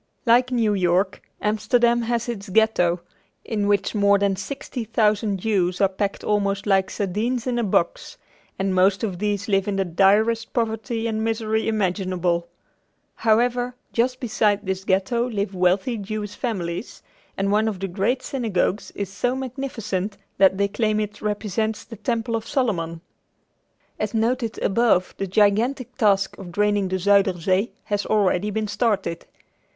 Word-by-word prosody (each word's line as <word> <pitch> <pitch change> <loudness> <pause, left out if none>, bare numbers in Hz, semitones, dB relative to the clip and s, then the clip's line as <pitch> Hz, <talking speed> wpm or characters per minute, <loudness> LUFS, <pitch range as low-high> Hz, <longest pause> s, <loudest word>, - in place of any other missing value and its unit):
Like 245 +2 +4
New 230 -4 +2
York, 190 +1 +1 0.2
Amsterdam 235 +3 +2
has 235 0 -1
its 215 -4 -5
Ghetto, 185 -5 +2 0.4
in 210 -3 -1
which 200 -1 +1
more 200 -1 +4
than 200 -1 +1
sixty 250 +3 -5
thousand 215 -2 +1
Jews 185 -3 0
are 195 - +5
packed 195 +1 -3
almost 200 -1 0
like 195 -2 +2
sardines 225 +5 -2
in 245 -2 0
a - - +1
box, 185 -4 0 0.4
and 190 0 0
most 190 +2 +3
of 190 -5 -2
these 205 -1 -1
live 195 -2 +1
in 205 - -1
the 195 0 0
direst 210 +6 +2
poverty 225 0 -1
and 220 -1 -1
misery 220 -1 0
imaginable. 185 -4 0 0.7
However, 245 +2 +1 0.2
just 250 +2 +1
beside 210 -3 +1
this 190 0 -3
Ghetto 235 +6 +1
live 200 -3 -2
wealthy 185 +6 +1
Jewish 210 0 -5
families, 185 -5 -4 0.3
and 195 +1 0
one 215 +2 +3
of 205 -4 -3
the 195 - -2
great 200 +8 -1
synagogues 220 -7 -1
is 200 -2 -3
so 245 +6 0
magnificent 235 -7 -4 0.2
that 190 -1 +5
they 200 0 +2
claim 215 +1 0
it 210 -1 -4
represents 215 +1 -2
the 225 - -11
Temple 230 0 -1
of 225 -1 -4
Solomon. 170 - -1 1.0
As 215 +1 -2
noted 230 0 0
above 195 -3 +2
the 195 - -1
gigantic 220 +6 +1
task 200 -5 +2
of 185 -3 -8
draining 205 +1 +1
the 185 0 -1
Zuyder 195 -1 +3
Zee 185 +6 +1
has 205 -1 -2
already 205 -1 +2
been 215 +1 -2
started. 200 -6 -1
210 Hz, 155 wpm, -23 LUFS, 195-230 Hz, 1.0 s, are